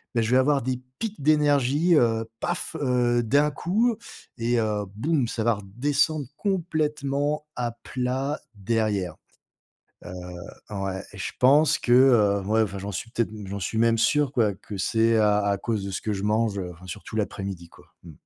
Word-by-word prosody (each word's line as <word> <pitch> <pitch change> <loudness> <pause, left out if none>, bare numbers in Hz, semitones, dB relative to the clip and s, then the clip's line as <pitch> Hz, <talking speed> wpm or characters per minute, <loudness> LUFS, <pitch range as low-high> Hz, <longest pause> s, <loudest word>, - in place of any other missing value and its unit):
beh, 115 - +3
je 110 - -1
vais 130 - +5
avoir 140 +2 +3
des 125 +1 -2 0.2
pics 215 -6 -4
d'énergie, 150 +2 +3
heu, 115 -5 +3 0.2
paf! 175 -1 -3
Heu, 125 -3 +2
d'un 145 +6 +3
coup, 210 - +1 0.4
et, 120 0 +1
heu, 105 -2 -1
boum! 140 +3 0
Ça 115 -1 -3
va 115 0 +3
redescendre 140 +9 0
complètement 150 -6 -1
à 120 -1 -2
plat 130 +3 -2 0.2
derrière. 100 -4 -1 0.9
Heu, - - -7 0.6
ouais, 95 -2 -3
et - - -10
je - - -4
pense 145 +5 +5
que, 120 - -2
heu 115 -6 +5
ouais 110 +1 +3
enfin, 100 -3 -2
j'en 100 +2 -5
suis 115 +5 -5
peut-être 115 -3 -1
m 105 -2 -8
j'en 100 +1 -4
suis 100 +4 -3
même 115 0 +3
sûr 135 +5 +2
quoi, 115 -6 +2
que 100 +1 -9
c'est 115 +3 +2
à 105 -1 +4
à 100 -1 +1
cause 105 0 -2
de 100 - -4
ce 95 - -2
que 105 - -2
je 100 -1 -4
mange. 105 -1 +1
Heu, 90 -2 -4
enfin 85 +2 -15
surtout 95 +4 -7
l'après-midi, 95 -4 -4
quoi, - - -19 0.2
mmh. 85 - -11
115 Hz, 185 wpm, -25 LUFS, 105-145 Hz, 0.9 s, vais